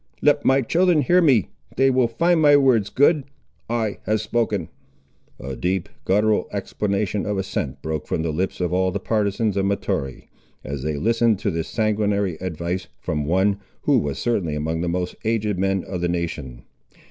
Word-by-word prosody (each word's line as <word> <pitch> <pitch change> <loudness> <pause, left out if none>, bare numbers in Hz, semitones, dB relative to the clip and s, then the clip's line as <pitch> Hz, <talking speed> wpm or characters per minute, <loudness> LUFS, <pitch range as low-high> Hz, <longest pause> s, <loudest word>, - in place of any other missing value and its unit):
Let 145 -1 +4
my 135 0 +3
children 170 +3 +3
hear 180 +8 +4
me. 130 - +3 0.3
They 135 +1 +4
will 130 -2 +3
find 165 +8 +2
my 145 -1 +7
words 125 -7 +3
good. 145 +2 +3 0.5
I 115 -3 -1
have 110 0 +2
spoken." 105 -5 -1 0.7
A 65 +1 -6
deep 90 +8 -1 0.2
guttural 105 +2 +2
exclamation 100 0 -2
of 105 -1 -1
assent 85 -8 -3
broke 80 -1 -3
from 80 - -1
the 80 - -1
lips 90 +5 -2
of 90 -1 -1
all 95 0 +2
the 100 +2 -3
partisans 105 0 0
of 100 0 +1
Mahtoree, 70 -9 -3 0.3
as 70 0 -5
they 75 +1 -2
listened 115 +3 +2
to 100 - 0
this 80 -1 -3
sanguinary 105 -4 0
advice 90 +1 -3
from 75 -1 -2
one, 95 +5 +2 0.2
who - - +4
was 75 -1 -3
certainly 95 -11 -1
among 80 +2 -2
the 85 - -1
most 90 +1 -2
aged 110 -4 0
men 95 -1 +1
of 90 -2 -5
the 90 - 0
nation. 80 -8 -4
100 Hz, 175 wpm, -22 LUFS, 85-115 Hz, 0.7 s, my